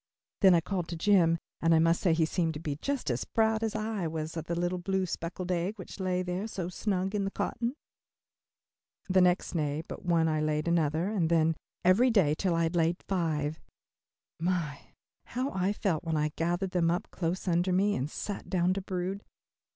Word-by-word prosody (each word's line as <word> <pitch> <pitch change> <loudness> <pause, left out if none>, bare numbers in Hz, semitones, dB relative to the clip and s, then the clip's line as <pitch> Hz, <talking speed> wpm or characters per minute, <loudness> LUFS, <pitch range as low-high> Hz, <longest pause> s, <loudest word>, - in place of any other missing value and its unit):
Then 190 -3 +7
I 170 - +4
called 180 -1 -3
to 170 - -4
Jim 170 -2 +4 0.2
and 165 0 +4
I - - +5
must 165 +1 +3
say 175 -4 +3
he 160 0 +3
seemed 160 -1 -1
to - - -4
be 150 -3 -3
just 280 - -1
as 120 - -1
proud 220 -1 +1
as 225 -1 -1
I 215 -5 -2
was 160 0 -4
of 165 -2 -4
the 170 0 -2
little 175 +1 -1
blue 190 +1 0
speckled 175 +1 -4
egg 180 +4 -1
which 185 +1 -9
lay 185 -1 0
there 180 +4 -3
so 185 -5 -4
snug 190 0 -1
in 205 -1 0
the 195 - -1
cotton. 235 +5 -2 1.3
The 185 0 +4
next 180 0 +3
day 150 -2 -1
but - - -8
one 170 -2 +3
I 155 -1 +1
laid 155 +1 0
another, 165 +2 +1
and 180 -7 +1
then 165 -1 +4
one 165 - 0 0.3
every 210 +8 +5
day 190 -11 +4
till 175 +2 0
I 165 - +2
had 165 +2 -1
laid 170 +1 +1
five. 160 -5 -1 0.8
My, 165 -4 -1 0.5
how 255 +3 -2
I 190 +1 0
felt 190 -6 -1
when 165 -2 -1
I 150 0 +1
gathered 175 +3 -1
them 170 -2 +2
up 175 +1 -2
close 180 +2 -2
under 175 +1 +2
me 200 +3 +3
and 130 +3 -2
sat 205 +5 -5
down 180 -1 +2
to 195 - -3
brood. 185 +2 -3
175 Hz, 205 wpm, -30 LUFS, 165-190 Hz, 1.3 s, Then